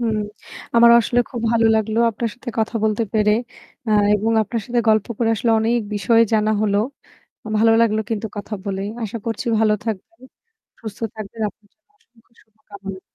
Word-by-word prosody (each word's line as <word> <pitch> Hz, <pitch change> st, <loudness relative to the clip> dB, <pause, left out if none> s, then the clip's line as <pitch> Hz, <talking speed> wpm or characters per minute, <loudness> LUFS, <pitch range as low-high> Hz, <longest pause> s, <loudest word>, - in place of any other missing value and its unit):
হুম। 225 Hz, -2 st, 0 dB, 0.6 s
আমার 235 Hz, 0 st, +7 dB
আসলে 245 Hz, +1 st, +1 dB
খুব 240 Hz, -, -5 dB
ভালো 230 Hz, -1 st, +3 dB
লাগলো 220 Hz, 0 st, 0 dB
আপনার 230 Hz, +1 st, -3 dB
সাথে 245 Hz, +1 st, -10 dB
কথা 220 Hz, +2 st, -1 dB
বলতে 215 Hz, +1 st, +1 dB
পেরে। 210 Hz, -1 st, +3 dB, 0.6 s
আ -, -, 0 dB, 0.2 s
এবং 215 Hz, +2 st, 0 dB
আপনার 225 Hz, +2 st, -3 dB
সাথে 240 Hz, -1 st, +1 dB
গল্প 215 Hz, -2 st, +3 dB
করে 230 Hz, -, +1 dB
আসলে 230 Hz, +2 st, 0 dB
অনেক 235 Hz, +2 st, +1 dB
বিষয় 225 Hz, +3 st, +3 dB
জানা 215 Hz, -1 st, +2 dB
হলো। 205 Hz, -1 st, +2 dB, 0.8 s
ভালো 225 Hz, +1 st, +5 dB
লাগলো 220 Hz, -2 st, +2 dB
কিন্তু 220 Hz, -1 st, -2 dB
কথা 205 Hz, +1 st, -7 dB
বলেই। 195 Hz, 0 st, -3 dB
আশা 220 Hz, +1 st, -4 dB
করছি 230 Hz, +2 st, -3 dB
ভালো 215 Hz, -1 st, +3 dB
থাকবেন, 225 Hz, +1 st, -6 dB, 0.6 s
সুস্থ 220 Hz, -4 st, -8 dB, 0.2 s
থাকবেন। 215 Hz, +1 st, -8 dB
আপনার 205 Hz, 0 st, -18 dB
জন্য 320 Hz, -, -50 dB
অসংখ্য 245 Hz, -, -31 dB
শুভ 220 Hz, -, -31 dB
কামনা। 195 Hz, -2 st, -8 dB
220 Hz, 175 wpm, -20 LUFS, 210-230 Hz, 0.8 s, আমার